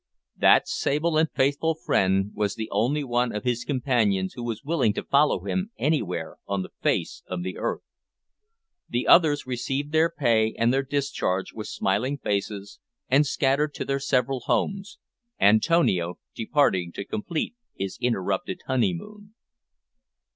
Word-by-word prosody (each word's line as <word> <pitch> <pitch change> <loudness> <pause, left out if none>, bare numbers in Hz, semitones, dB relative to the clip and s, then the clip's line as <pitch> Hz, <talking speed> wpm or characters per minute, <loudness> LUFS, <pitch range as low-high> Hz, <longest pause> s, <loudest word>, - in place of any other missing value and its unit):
That - - +5
sable 155 +3 0
and 160 -1 +2
faithful 145 +4 +1
friend 95 -8 +1
was 105 -1 -1
the 110 -1 -4
only 125 +9 +1
one 120 -2 0
of 105 - -4
his 120 -1 -1
companions 115 -9 0
who 125 - -8
was 115 -1 -4
willing 140 -8 +1
to - - -4
follow 145 +2 +2
him 190 +2 -1
anywhere 100 - -1
on 100 -1 -1
the - - -10
face - - 0
of 90 -1 -4
the 90 0 -5
earth. - - -2 1.1
The 120 +1 -1
others 155 -4 +5
received 135 +3 -3
their 160 +1 +3
pay 115 -8 +1
and 115 +2 +2
their 135 - +2
discharge 135 -9 -2
with 110 -1 -6
smiling 115 +11 -1
faces, 100 -3 -3 0.3
and 140 +3 +4
scattered 140 +2 +1
to - - -4
their 140 0 -1
several 135 0 0
homes 200 - -2 0.4
Antonio 100 - +3 0.2
departing 110 - +1
to 100 - -5
complete 155 - -3 0.2
his 95 0 -5
interrupted 115 -7 -1
honeymoon. 130 - -2
125 Hz, 145 wpm, -25 LUFS, 100-145 Hz, 1.1 s, That